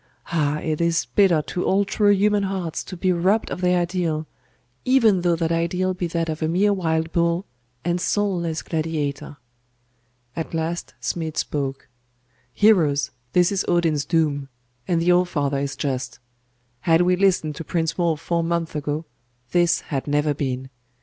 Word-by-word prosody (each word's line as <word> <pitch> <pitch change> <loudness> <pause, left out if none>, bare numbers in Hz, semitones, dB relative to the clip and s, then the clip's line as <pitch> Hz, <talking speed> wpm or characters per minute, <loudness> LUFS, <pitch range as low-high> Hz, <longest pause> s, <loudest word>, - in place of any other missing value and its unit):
Ah, 150 -3 +1
it 155 0 -2
is 170 -1 +1
bitter 180 -7 +4
to 180 +4 -3
all 200 +1 +2
true 205 +1 +2
human 205 +1 +3
hearts 190 -4 -3
to 185 - -8
be 185 +2 +1
robbed 190 +6 +1
of - - -4
their 180 0 +3
ideal, 170 -3 -1 0.6
even 230 -8 +4
though 175 -1 +2
that 165 0 -1
ideal 180 +3 0
be 180 -1 -3
that 165 0 -1
of 160 0 -4
a 155 - +1
mere 195 +5 +3
wild 160 -3 -1
bull, 170 +2 +1 0.4
and 175 0 0
soulless 175 -7 0
gladiator.... 155 -3 -3 1.0
At 165 0 -4
last 165 +1 -3
Smid 160 -2 -3
spoke 135 -2 -3 0.6
'Heroes, 150 - +3 0.2
this 180 +1 +4
is 195 - 0
Odin's 165 -4 +2
doom; 150 -5 0 0.4
and 170 -2 +2
the 170 +2 +3
All 180 0 +5
father 145 -5 -1
is 140 0 -3
just. 130 -3 -3 0.6
Had 165 +6 +3
we 180 +1 +3
listened 180 -5 +2
to - - -5
Prince 165 -1 -1
Wulf 170 -4 0
four 170 +1 -1
months 170 -1 -1
ago, 150 +1 -3 0.5
this 175 -1 +3
had 140 -2 -4
never 145 +1 +1
been. 130 -2 -3
170 Hz, 165 wpm, -23 LUFS, 155-180 Hz, 1.0 s, All